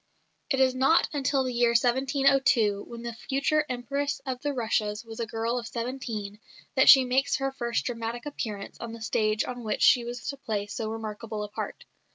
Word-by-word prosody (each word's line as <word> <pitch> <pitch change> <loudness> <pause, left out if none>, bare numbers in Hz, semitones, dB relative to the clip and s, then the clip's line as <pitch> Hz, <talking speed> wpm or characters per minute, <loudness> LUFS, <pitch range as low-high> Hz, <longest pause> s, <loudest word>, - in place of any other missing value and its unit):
It 270 -3 +1
is 260 -1 +4
not 270 +6 +4
until 275 -1 +1
the 255 -1 -3
year 235 0 +3
1702, 260 -3 +3
when 235 0 -8
the 235 0 -4
future 280 +5 0
Empress 275 +3 -2
of 255 -2 -4
the 290 - -1
Russias 220 -4 -1
was 225 0 -9
a 230 - -2
girl 230 +2 -1
of 230 - -7
seventeen, 230 -3 -5 0.3
that - - +5
she 265 -2 +9
makes 265 +2 +2
her 270 0 -1
first 235 -3 -2
dramatic 235 0 -4
appearance 215 -9 -5
on 235 -1 -6
the 230 - -9
stage 215 0 +1
on 245 -1 -6
which 215 - -1
she 245 - +6
was 240 +1 -6
to 280 - -4
play 215 -6 -3
so 215 +1 -4
remarkable 220 -1 -5
a 210 - -6
part. 210 - -6
240 Hz, 195 wpm, -27 LUFS, 225-265 Hz, 0.3 s, she